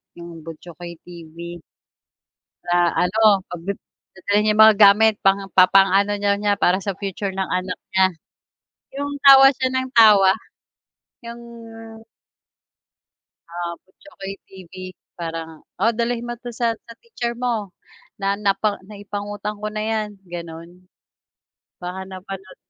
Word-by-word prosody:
'yong 170 -2 -11
Buchokoy 170 +1 -10
TV. 170 0 -10 1.1
Sa 175 - 0 0.3
ano, 205 -1 +3
'pag 175 -1 -9 0.5
dadalhin 205 +2 0
niya 210 - 0
mga 220 -1 +8
gamit, 210 +1 +6
pang 195 0 +2
papaano 195 +2 +5
niya 205 0 0
para 185 +2 +2
sa 200 - -2
future 195 0 -4
ng 190 0 -3
anak 185 0 -3 0.2
niya. 190 0 +5 0.9
Yung 285 0 -3
tawa 270 -1 +9
siya 260 +1 -1
ng 260 0 -1
tawa. 205 -4 +7 0.9
Yung 235 0 -9 2.1
ah, 170 0 -4
Butchokoy 195 0 -11
TV, 185 -3 -14 0.5
parang, 165 -1 -6 0.2
oh 230 +3 +4
dalhin 235 0 -2
mo 240 - -4
'to 245 0 -9
sa 230 -1 0
sa 230 +1 -15
teacher 240 - -4
mo, 230 -5 -2 0.5
na 195 0 0
na 200 -1 +2 0.4
naipangutang 205 0 -6
ko 215 - -3
na 215 0 -4
yan, 215 -1 -1 0.2
ganon. 170 -1 -8 1.1
Baka 185 +2 -6
napanood 190 0 -9
195 Hz, 120 wpm, -21 LUFS, 180-220 Hz, 2.1 s, tawa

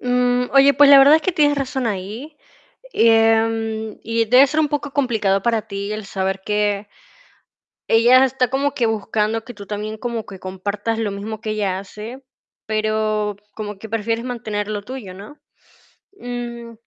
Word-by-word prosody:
Mm, 250 0 +1
oye, 275 +1 +6
pues, 290 -1 +6
la 280 - +10
verdad 280 +3 +7
es 320 - -3
que 375 - 0
tienes 290 -3 +2
razón 265 -2 -2
ahí. 220 +9 -5 0.6
Em, 225 -1 +2
y 230 0 0
debe 255 +5 +6
ser 305 +3 0
un 300 - +1
poco 290 -1 -3
complicado 220 -8 +1
para 230 -1 +1
ti 200 -1 -5
el 215 -1 -6
saber 190 0 -3
que 210 -1 -1 1.0
ella 240 +3 +6
está 260 -1 0
como 275 +3 0
que 240 -4 +1
buscando 220 0 -1
que 245 - -9
tú 205 -3 -11
también 215 +1 -5
como 235 -1 -4
que 195 -3 -11
compartas 200 +4 -4
lo 220 -2 -1
mismo 205 +2 -6
que 220 - -3
ella 200 -3 -1
hace, 215 +6 -9 0.4
pero 215 -1 -1 0.2
como 210 -2 -6
que 220 +1 -10
prefieres 225 +1 -2
mantener 215 -4 -4
lo 210 -1 -3
tuyo, 240 -4 -8
¿no? 200 +10 -12 0.8
Mm, 240 -1 -6
225 Hz, 165 wpm, -20 LUFS, 210-250 Hz, 1.0 s, la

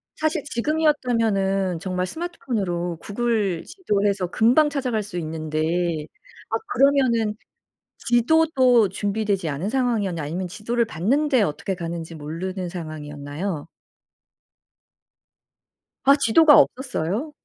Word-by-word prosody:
사실 310 -1 -1
지금이었다면은 230 - 0
정말 185 0 -2
스마트폰으로 195 - -3
구글 210 -5 -1
지도해서 205 - -1
금방 240 - +4
찾아갈 255 -7 -1
수 195 -3 -7
있는데 155 -1 -4 0.9
아 - - -1 0.2
그러면은 250 -5 +3 0.6
지도도 250 -3 +3
준비되지 200 -2 -1
않은 150 +8 -3
상황이었나요 220 - 0
아니면 175 +5 -3
지도를 230 +5 -1
봤는데 255 - +1
어떻게 190 +1 -1
가는지 170 -1 -5
모르는 175 +5 -5
상황이었나요? 155 0 -6 2.4
아 275 +1 +6
지도가 295 +3 +6
없었어요? 255 - 0
205 Hz, 290 characters per minute, -23 LUFS, 175-255 Hz, 2.4 s, 아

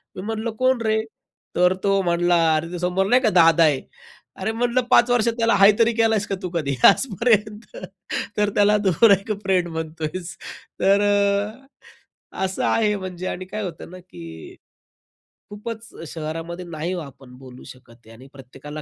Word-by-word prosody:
मी - - -6
म्हणलं, 220 +3 -4
"कोण 255 +2 0
रे?" 220 0 +1 0.5
तर 180 +1 +3
तो 195 -1 +2
म्हणला 175 -1 +1 0.2
"अरे, 165 +2 -3
ते 175 - -5
समोर 180 +2 0
नाही 250 +5 +4
का 230 - +2
दादा 165 -1 +5
आहे!" 145 -4 +2 0.6
अरे 190 +3 -2
म्हटलं 240 +2 0
"पाच 245 -1 +5
वर्ष 240 -2 +2
त्याला 230 0 +1
'हाय' 200 +1 +7
तरी 230 0 +3
केलयंस 225 -3 +1
का, 195 - -2
तू 180 - -3
कधी 145 -5 -2
आजपर्यंत? 215 -1 0 0.7
तर 210 0 +2
त्याला 205 +1 +4
तू 190 - +4 0.2
एक 195 +3 -2
फ्रेंड 185 -2 +1
म्हणतोयस!" 160 +2 -6 0.5
तर 195 +1 +4 1.3
अ, - - -5
असं 190 0 -4
आहे 210 -2 +1
म्हणजे. 185 -2 -7
आणि 185 - -5
काय 210 +3 -6
होतं 175 -4 -7
ना, 185 - -10
की 85 - -12 0.9
खूपच 220 +2 -8 0.2
शहरामध्ये 165 +3 -6
नाही 170 0 -5
हो, 180 - -3
आपण 135 -3 -13
बोलू 130 -1 -13
शकत 120 -3 -16
आणि 125 +4 -15
प्रत्येकाला 140 +3 -10
185 Hz, 165 wpm, -22 LUFS, 160-215 Hz, 1.3 s, हाय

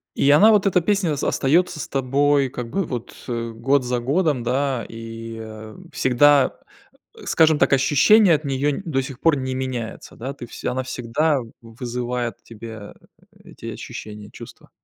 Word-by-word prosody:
И 140 - +2
она, 205 +10 +7
вот 210 -2 +3
эта 185 -2 +3
песня, 185 -4 +1
с 140 - -5
остается 160 +4 +1
с - - -5
тобой 140 +1 +1
как 125 -2 -6
бы 195 +10 -1
вот 120 -5 -6
год 120 +3 0
за 125 0 -1
годом, 145 0 0
да, 130 0 -1
и, 115 0 -8
э, 110 -1 -10 0.2
всегда, 140 +2 +4 0.7
скажем 160 -1 +4
так, 140 - +3
ощущения 165 +9 +5
от 150 - -4
неё 140 +1 0
н 145 - -4
до 135 -5 0
сих 130 -1 -8
пор 165 -3 +3
не 130 0 -3
меняются, 130 -3 -5
да, 130 +4 -6
ты 130 - -9
все - - -5
она 130 +1 -2
всегда 130 +4 0 0.2
вызывает 120 0 -4
в - - -40
тебе, 110 -2 -10 0.4
э, - - -23
эти - - -13
ощущения, 105 -1 -9
чувства. - - -13
130 Hz, 170 wpm, -22 LUFS, 115-145 Hz, 0.7 s, она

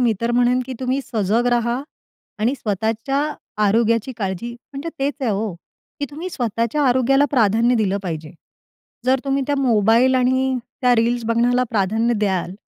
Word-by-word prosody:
मी 240 -3 +3
तर 230 0 0
म्हणेन 245 +1 +3
की 260 - -5
तुम्ही 260 +1 0
सजग 225 0 0
राहा 240 +1 0 0.6
आणि 230 +5 +1
स्वतःच्या 225 +3 -2 0.5
आरोग्याची 230 +3 +2
काळजी 200 +2 -3 0.2
म्हणजे 280 +4 -5
तेच 280 +1 0
आहे 250 -4 0
हो, 205 -1 -2 0.5
की - - 0
तुम्ही 320 +5 -6
स्वतःच्या 235 - -1
आरोग्याला 260 +3 +3
प्राधान्य 230 -1 +3
दिलं 200 -3 +1
पाहिजे. 160 -3 -5 0.7
जर 260 +1 +2
तुम्ही 275 0 0
त्या 285 - 0
मोबाईल 235 0 +3
आणि 260 +1 +2 0.2
त्या 250 -1 +4
रील्स 235 +1 +1
बघण्याला 240 +2 +2
प्राधान्य 220 +3 +1
द्याल, 190 -3 -1
235 Hz, 150 wpm, -21 LUFS, 220-260 Hz, 0.7 s, त्या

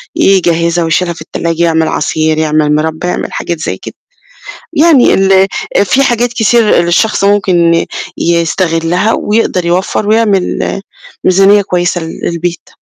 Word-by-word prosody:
يجهّزها 170 -3 +1
ويشيلها 170 +2 0
في 165 - -13
التلّاجة، 170 0 -3
يعمل 160 -1 +1
عصير، 155 0 -1
يعمل 155 -1 +1
مِربّى، 160 +3 -2
يعمل 180 - -3
حاجات 170 -2 -4
زي - - -4
كده. - - -10 0.8
يعني 310 -4 +4
ال 195 0 +3 0.4
في 270 +7 +1
حاجات 240 -2 0
كتير 235 0 +2 0.2
للشخص 195 +4 +1
ممكن 175 -5 +2 0.3
يستغلّها 170 +3 0
ويقدر 210 -4 0
يوفَّر 185 +4 -1
ويعمل 210 -3 0 0.4
ميزانية 195 +2 +4
كويسة 175 -1 -1
ل 165 0 -8
للبيت. 170 0 -4
175 Hz, 125 wpm, -11 LUFS, 165-200 Hz, 0.8 s, يعني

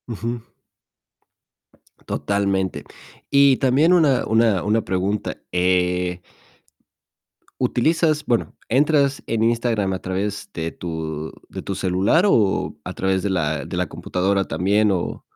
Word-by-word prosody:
Ujú. 115 +1 -4 1.7
Totalmente. 95 -5 -1 0.5
Y 140 -2 +5
también 140 +7 +3
una 150 -8 +3
una 110 -4 +2
una 110 +2 +1
pregunta, 95 +3 -2
eh 90 0 +1 1.4
¿utilizas 155 +2 +1
bueno, 120 -2 -1
entras 140 +1 +2
en 110 -1 0
Instagram 115 -4 +1
a 95 - -3
través 100 +3 -3
de 80 0 -3
tu 80 -2 -5 0.2
de - - -7
tu 95 - -4
celular 95 - +2
o 105 - +2
a 90 - -6
través 95 0 0
de 100 - -2
la 80 -6 -1
de - - -5
la - - +1
computadora 95 +2 -1
también 100 +6 +2
o 90 -3 -3
100 Hz, 120 wpm, -21 LUFS, 90-120 Hz, 1.7 s, Y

